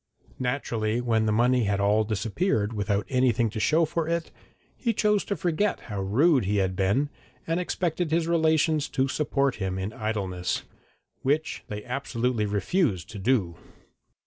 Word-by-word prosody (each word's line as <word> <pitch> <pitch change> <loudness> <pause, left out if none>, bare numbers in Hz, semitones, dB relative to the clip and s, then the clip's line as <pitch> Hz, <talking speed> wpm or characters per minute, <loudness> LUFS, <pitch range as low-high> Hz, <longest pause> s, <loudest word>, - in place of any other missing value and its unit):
Naturally, 120 -4 -1
when 115 -2 +1
the - - +2
money 120 +2 +3
had 100 0 0
all 105 +2 +3
disappeared 110 - -1
without 100 -1 -1
anything 125 -3 +2
to 110 - -4
show 160 +10 +3
for 160 +1 -2
it, 170 0 -2 0.4
he 235 -2 -1
chose 210 -1 +2
to 200 - -2
forget 175 +5 0
how 100 -4 -5
rude 130 - +3
he 105 +2 +1
had 95 -1 +1
been, 100 +11 +1 0.3
and 165 +2 0
expected 175 -1 -1
his 165 +1 +1
relations 160 -2 +2
to 135 +1 +1
support 140 -1 0
him 95 -2 -2
in 95 +3 -3
idleness, 100 -6 -2 0.6
which 150 +4 0
they 105 0 -6
absolutely 125 -3 -1
refused 105 - 0
to 105 - -7
do. 95 -6 +1
120 Hz, 155 wpm, -26 LUFS, 105-155 Hz, 0.6 s, money